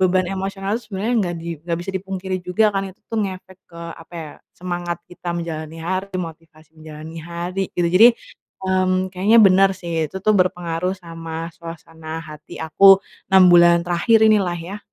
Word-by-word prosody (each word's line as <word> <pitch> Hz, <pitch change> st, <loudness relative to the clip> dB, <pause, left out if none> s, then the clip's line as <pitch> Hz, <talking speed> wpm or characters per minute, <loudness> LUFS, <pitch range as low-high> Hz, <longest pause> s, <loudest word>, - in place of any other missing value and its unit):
beban 185 Hz, 0 st, +2 dB
emosional 195 Hz, +1 st, -3 dB
itu 240 Hz, -, -8 dB
sebenarnya 210 Hz, +5 st, -1 dB
nggak 175 Hz, -3 st, -2 dB
di 165 Hz, +1 st, -7 dB
nggak 170 Hz, -1 st, -2 dB
bisa 195 Hz, -, -5 dB
dipungkiri 190 Hz, 0 st, -4 dB
juga 200 Hz, +3 st, +1 dB
kan 195 Hz, -, 0 dB
itu 185 Hz, -, -21 dB
tuh 225 Hz, -, -3 dB
ngefek 185 Hz, -1 st, -7 dB
ke, 170 Hz, -, -12 dB, 0.2 s
apa 165 Hz, +1 st, -15 dB
ya, 155 Hz, -2 st, -7 dB, 0.2 s
semangat 175 Hz, -1 st, -4 dB
kita 180 Hz, 0 st, -7 dB
menjalani 160 Hz, -1 st, -6 dB
hari, 185 Hz, +4 st, -3 dB
motivasi 160 Hz, -2 st, -9 dB
menjalani 155 Hz, +1 st, -10 dB
hari 175 Hz, +3 st, -4 dB
gitu. 175 Hz, -1 st, +2 dB
Jadi, 190 Hz, +8 st, +7 dB, 0.6 s
mmm, 185 Hz, 0 st, +1 dB
kayaknya 205 Hz, +5 st, +4 dB
bener 195 Hz, -2 st, +6 dB
sih, 165 Hz, -3 st, -3 dB
itu 190 Hz, -, -8 dB
tuh 215 Hz, +2 st, +2 dB
berpengaruh 180 Hz, 0 st, 0 dB
sama 165 Hz, -1 st, -7 dB
suasana 165 Hz, -1 st, -9 dB
hati 155 Hz, -1 st, -11 dB
aku 195 Hz, +5 st, +6 dB, 0.3 s
6 190 Hz, -1 st, +7 dB
bulan 170 Hz, 0 st, +6 dB
terakhir 175 Hz, +6 st, +3 dB
inilah 195 Hz, -5 st, +2 dB
ya. 185 Hz, +5 st, -7 dB
180 Hz, 170 wpm, -20 LUFS, 165-190 Hz, 0.6 s, Jadi